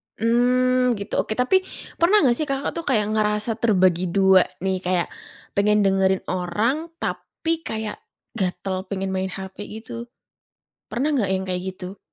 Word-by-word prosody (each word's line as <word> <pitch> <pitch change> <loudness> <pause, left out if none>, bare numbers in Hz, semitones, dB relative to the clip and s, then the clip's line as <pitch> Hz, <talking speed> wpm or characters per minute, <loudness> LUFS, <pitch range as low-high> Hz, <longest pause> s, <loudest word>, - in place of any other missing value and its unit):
Mmm, 250 +2 +3
gitu, 200 +2 -7
oke 215 - -1
tapi, 320 +10 +3 0.4
pernah 355 +2 +5
nggak 240 -3 +4
sih 310 - -1
Kakak, 275 0 -1
tuh, 335 - -5
kayak 215 -5 +2
ngerasa 210 +1 +1
terbagi 185 -5 +3
dua 190 0 +5 0.2
nih, 190 -1 0
kayak 180 -1 0 0.5
pengen 210 +1 +3
dengerin 190 -1 +2
orang, 215 - -1
tapi 330 -2 -3
kayak 220 -5 -5 0.3
gatel 190 -2 -2
pengen 195 -1 -2
main 190 0 -1
hepe 190 +2 -7
gitu? 230 +2 -8 0.8
Pernah 285 +5 0
nggak 200 -6 +1
yang 190 0 -1
kayak 180 0 -2
gitu? 185 +1 -9
210 Hz, 150 wpm, -23 LUFS, 190-250 Hz, 0.8 s, pernah